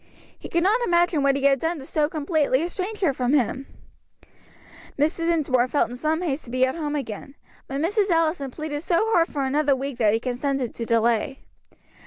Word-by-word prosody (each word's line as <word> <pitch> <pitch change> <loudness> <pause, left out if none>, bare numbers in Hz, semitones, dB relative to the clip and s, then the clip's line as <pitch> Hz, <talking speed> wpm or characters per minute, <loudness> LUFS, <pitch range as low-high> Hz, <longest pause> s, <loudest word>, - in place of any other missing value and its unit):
He - - -9
could 340 0 +1
not 430 +6 +3
imagine 345 -6 +2
what 275 0 +3
he 280 - -3
had 275 -1 +4
done 325 +3 -1
to 270 - -9
so 300 +1 0
completely 305 -3 +1
estrange 375 +5 -4
her 320 -8 +2
from 255 0 0
him. 265 0 0 1.3
Mr. 315 +3 +1
Dinsmore 275 -7 +2
felt 255 -2 0
in - - -6
some 310 +6 -1
haste 295 -3 -2
to - - -12
be 255 +1 +2
at 260 - -2
home 300 -3 -3
again, 275 0 -6 0.3
but 275 +1 -4
Mrs. 400 +4 +1
Allison 325 -4 +1
pleaded 295 +2 -5
so 360 +6 +1
hard 335 -1 +4
for 285 -2 -3
another 285 +1 +2
week 270 -1 -5
that 215 -3 +4
he - - 0
consented 255 +1 -2
to 230 - -5
delay. 230 +4 +1
290 Hz, 200 wpm, -24 LUFS, 265-330 Hz, 1.3 s, had